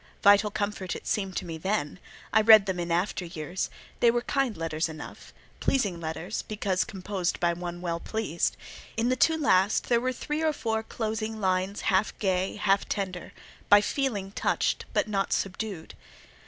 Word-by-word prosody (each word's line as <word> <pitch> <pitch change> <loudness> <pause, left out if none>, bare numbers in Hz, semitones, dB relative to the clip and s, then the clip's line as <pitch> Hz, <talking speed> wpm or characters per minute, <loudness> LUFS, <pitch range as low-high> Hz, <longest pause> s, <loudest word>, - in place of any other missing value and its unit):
Vital 205 +1 +6
comfort 205 -3 -3
it - - -9
seemed 195 -3 -1
to - - -3
me 165 -2 -6
then: 190 -3 -1 0.3
I 220 - +6
read 215 -2 +8
them 190 -3 -2
in 175 0 -3
after 180 +2 0
years; 175 +1 -4 0.3
they 235 - +5
were 240 +1 +1
kind 270 -5 0
letters 160 0 -1
enough—pleasing 185 - -3
letters, 160 +5 -4
because 200 -3 -1
composed 190 -4 -3
by 170 -1 +2
one 175 0 -6
well 170 -2 -2
pleased; 215 -4 -1 0.4
in 230 +2 +2
the 255 - +2
two 320 +5 +3
last 200 -9 +2
there 235 -1 +4
were 255 +1 0
three 300 +4 -3
or 315 -1 +2
four 220 -5 -1
closing 220 0 -3
lines 190 0 0
half 195 0 +1
gay, 190 -2 0
half 200 -1 +1
tender, 185 -3 -3 0.4
"by 205 - +9
feeling 210 -4 -1
touched, - - 0
but - - +1
not 195 -2 -1
subdued." 195 -3 -3
200 Hz, 170 wpm, -28 LUFS, 180-220 Hz, 0.4 s, by